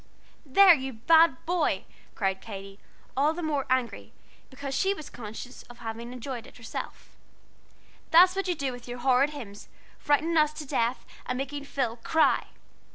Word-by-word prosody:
"There, 370 +7 +8
you 265 -3 -3
bad 320 +5 +4
boy!" 330 - 0 0.3
cried 190 -1 -1
Katy, 195 -2 -9 0.4
all 290 +4 +3
the 345 +1 -5
more 295 -3 -1
angry 255 -2 -1 0.4
because 275 0 -6
she 385 +9 +1
was 310 -5 -10
conscious 235 +2 -8
of 240 - -12
having 230 +1 -6
enjoyed 250 -1 -6
it - - -16
herself, 230 -2 -7 1.0
"that's 360 +3 +7
what 390 0 -2
you 355 - 0
do 275 -3 -2
with 245 -1 -10
your 245 0 -6
horrid 260 +3 +3
hymns, 230 -9 -9 0.3
frightening 320 +3 +1
us 305 -1 +4
to 305 0 -7
death 240 -3 -1 0.2
and 255 - -2
making 280 +2 -4
Phil 250 -5 -2
cry!" 315 +7 +2
265 Hz, 160 wpm, -27 LUFS, 235-305 Hz, 1.0 s, There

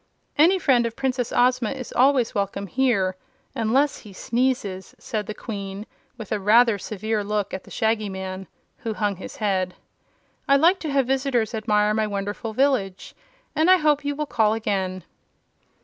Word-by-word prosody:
"Any 340 +6 +5
friend 255 -9 +3
of 230 - -7
Princess 260 -3 -1
Ozma 250 -2 +2
is 260 -3 -8
always 255 -2 +3
welcome 200 0 -2
here 200 -4 +1 0.4
unless 255 +6 +1
he 205 - -13
sneezes," 225 -4 -2
said 210 -2 -4
the 215 - -5
Queen 200 -2 -6 0.3
with 220 -4 -9
a 210 - 0
rather 220 +2 +4
severe 215 +2 -3
look 210 -1 -2
at 190 - -5
the - - -14
Shaggy 220 -2 0
Man, 190 0 -6 0.3
who 225 -5 -4
hung 205 -3 -1
his - - -9
head. 190 -4 -1 0.7
"I 275 - +5
like 340 +7 +4
to 310 - -4
have 275 -2 +2
visitors 260 -3 0
admire 210 -1 +1
my 215 0 0
wonderful 205 +2 -4
village, 220 -7 0 0.4
and 320 +3 +3
I 370 - +8
hope 300 -3 +2
you 285 0 -2
will 300 +1 -2
call 220 -5 +2
again." 190 -4 -2
220 Hz, 165 wpm, -23 LUFS, 200-265 Hz, 0.7 s, I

